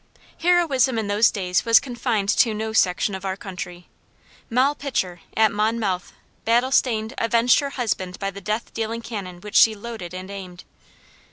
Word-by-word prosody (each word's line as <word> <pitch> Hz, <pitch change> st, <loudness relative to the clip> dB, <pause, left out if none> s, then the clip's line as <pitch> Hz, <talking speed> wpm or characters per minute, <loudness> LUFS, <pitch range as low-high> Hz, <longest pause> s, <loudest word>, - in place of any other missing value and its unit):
Heroism 315 Hz, -8 st, +3 dB
in 220 Hz, -, -1 dB
those 205 Hz, +2 st, +4 dB
days 180 Hz, -3 st, -1 dB
was 230 Hz, -1 st, +6 dB
confined 235 Hz, -5 st, -2 dB
to 225 Hz, 0 st, +3 dB
no 220 Hz, +1 st, -3 dB
section 185 Hz, 0 st, +2 dB
of 190 Hz, 0 st, -6 dB
our 190 Hz, 0 st, -3 dB
country. 180 Hz, -2 st, -8 dB, 0.6 s
Moll 255 Hz, +5 st, +3 dB
Pitcher, 190 Hz, -, -3 dB, 0.2 s
at 220 Hz, -1 st, +5 dB
Monmouth, 210 Hz, -3 st, -1 dB, 0.3 s
battle 240 Hz, +3 st, +2 dB
stained, 225 Hz, -3 st, +1 dB
avenged 230 Hz, +1 st, +4 dB
her 280 Hz, -, -2 dB
husband 195 Hz, -9 st, -3 dB
by 195 Hz, -1 st, -3 dB
the 200 Hz, +1 st, -10 dB
death 215 Hz, +4 st, -3 dB
dealing 225 Hz, +1 st, -3 dB
cannon 185 Hz, -6 st, -7 dB
which 210 Hz, +1 st, -9 dB
she 220 Hz, -1 st, +6 dB
loaded 210 Hz, -5 st, -7 dB
and 185 Hz, +2 st, -7 dB
aimed. 185 Hz, -3 st, -9 dB
220 Hz, 165 wpm, -23 LUFS, 190-235 Hz, 0.6 s, was